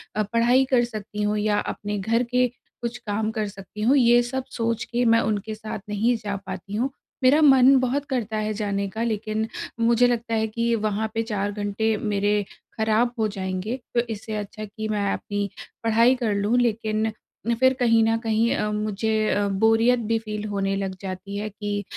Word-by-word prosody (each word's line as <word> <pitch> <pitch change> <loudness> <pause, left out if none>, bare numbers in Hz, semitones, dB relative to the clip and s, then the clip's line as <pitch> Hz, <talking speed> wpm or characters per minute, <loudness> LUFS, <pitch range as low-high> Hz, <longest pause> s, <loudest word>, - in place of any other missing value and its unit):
अ, 215 - +2
पढ़ाई 240 +3 +4
कर 255 -2 +3
सकती 210 -2 -6
हूँ 210 +1 +1
या 210 0 +1
अपने 205 0 -4
घर 230 +5 +1
के 250 +1 +2 0.3
कुछ 235 0 -3
काम 215 0 -2
कर 215 -2 -2
सकती 200 +1 -9
हूँ, 255 +6 +4
ये 240 -2 +6
सब 260 +2 -3
सोच 230 -1 -1
के 240 +1 -1
मैं 230 0 +5
उनके 215 0 -2
साथ 215 0 -6
नहीं 225 +4 +2
जा 205 -2 -4
पाती 200 - -6
हूँ। 245 +5 0 0.3
मेरा 275 +5 +6
मन 270 -2 +7
बहुत 260 +3 0
करता 225 -5 -2
है 215 0 -1
जाने 200 -1 -1
का 220 +4 -3
लेकिन 220 -1 -1 0.3
मुझे 235 +1 +4
लगता 235 -1 -1
है 220 0 +1
कि 230 +2 0
वहाँ 215 0 -1
पे 225 - 0
4 205 -3 -2
घंटे 205 +2 -1
मेरे 205 0 +1 0.3
खराब 220 +2 +2
हो 220 - +2
जाएँगे, 190 +3 -3 0.2
तो - - +4
इससे 225 -1 -5
अच्छा 210 +1 -5
कि 215 +1 -6
मैं 205 -2 0
अपनी 205 0 -3 0.3
पढ़ाई 230 +3 +4
कर 235 -5 -1
लूँ 205 +4 +1
लेकिन 220 -2 0 0.5
फिर 260 0 +5
कहीं 230 -3 +3
न 225 0 +2
कहीं 225 +1 +2
अम, 210 0 -1
मुझे 215 +1 0
अ, 205 0 +1
बोरियत 225 +5 +3
भी 230 - +3
फ़ील 210 -1 -5
होने 195 -1 -1
लग 195 -1 -3
जाती 195 +1 -6
है 210 +1 -3
की 205 0 -4
220 Hz, 190 wpm, -24 LUFS, 205-235 Hz, 0.5 s, मन